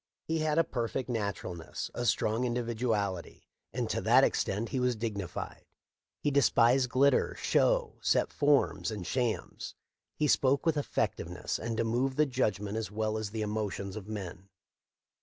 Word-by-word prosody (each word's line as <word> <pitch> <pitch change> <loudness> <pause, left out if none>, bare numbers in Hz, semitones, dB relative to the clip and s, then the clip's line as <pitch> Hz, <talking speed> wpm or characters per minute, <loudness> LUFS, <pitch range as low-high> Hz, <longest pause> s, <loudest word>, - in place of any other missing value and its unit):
He 160 0 -1
had 155 0 +1
a 165 - +6
perfect 130 -3 -3
naturalness, 100 -7 -4
a 120 - -2
strong 110 +1 +1
individu 120 -1 -1
ality; 100 -5 -2 0.3
and - - -2
to - - -1
that - - +5
extent 105 +4 0
he 130 - -1
was 125 -1 +1
dignified. 105 -5 -5 0.5
He 145 - 0
despised 125 -2 +4
glitter, 140 +3 +3
show, - - +2
set - - +2
forms, 145 -4 +2
and 105 -5 -5
shams. 120 0 -2 0.4
He 150 - +1
spoke 130 +5 +3
with 165 -2 +3
effectiveness 90 - -2
and 115 0 -3
to - - +2
move 125 +4 0
the 150 - +4
judg 125 -8 0
ment 105 +1 -4
as 110 -3 -3
well 110 +1 -1
as 110 -1 -3
the 110 +1 -3
emotions 105 -2 -3
of 105 -2 -7
men. 95 -3 -7
115 Hz, 160 wpm, -30 LUFS, 105-130 Hz, 0.5 s, a